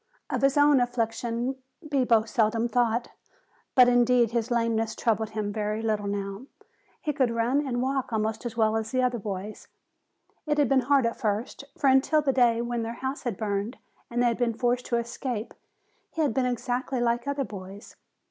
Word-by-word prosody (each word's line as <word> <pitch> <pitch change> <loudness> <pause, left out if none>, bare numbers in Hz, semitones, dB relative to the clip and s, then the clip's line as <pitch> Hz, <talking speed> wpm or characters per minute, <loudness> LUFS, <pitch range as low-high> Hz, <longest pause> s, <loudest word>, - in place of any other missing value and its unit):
Of - - -1
his 275 +1 +3
own 290 -1 +6
affliction 240 +1 -1 0.3
Bibo 250 -6 +3
seldom 225 -1 +1
thought, 235 -1 +1 0.7
but 250 -1 +8
indeed 245 -1 +4
his 235 0 -1
lameness 225 -2 0
troubled 220 -2 0
him 210 -1 -3
very 215 +1 -2
little 215 -2 -1
now. 200 +4 -4 0.5
He 300 - -2
could 265 -4 +2
run 230 +4 +1
and 245 -1 -1
walk 265 -1 -1
almost 220 +1 -1
as 235 -2 -5
well 220 -1 +3
as 220 -1 -2
the 255 -1 +1
other 245 -1 0
boys. 200 0 -6 0.8
It 300 0 +1
had 290 -2 +4
been 270 - +4
hard 275 -3 +5
at 230 - -2
first, 220 +5 -2
for 280 - +1
until 270 +3 +4
the 270 -2 +1
day 235 -2 +3
when 240 -1 -2
their 225 +1 -3
house 265 +3 -4
had 230 -6 -2
burned 205 +3 -2 0.3
and 240 +1 0
they - - +3
had 235 - -3
been 235 -2 +1
forced 245 +1 0
to 235 - +1
escape, 235 -1 -4 0.6
he 325 - -1
had 285 - +1
been 255 +1 +1
exactly 250 +1 -2
like 240 +1 0
other 280 -1 -1
boys. 195 0 -10
235 Hz, 185 wpm, -27 LUFS, 220-255 Hz, 0.8 s, but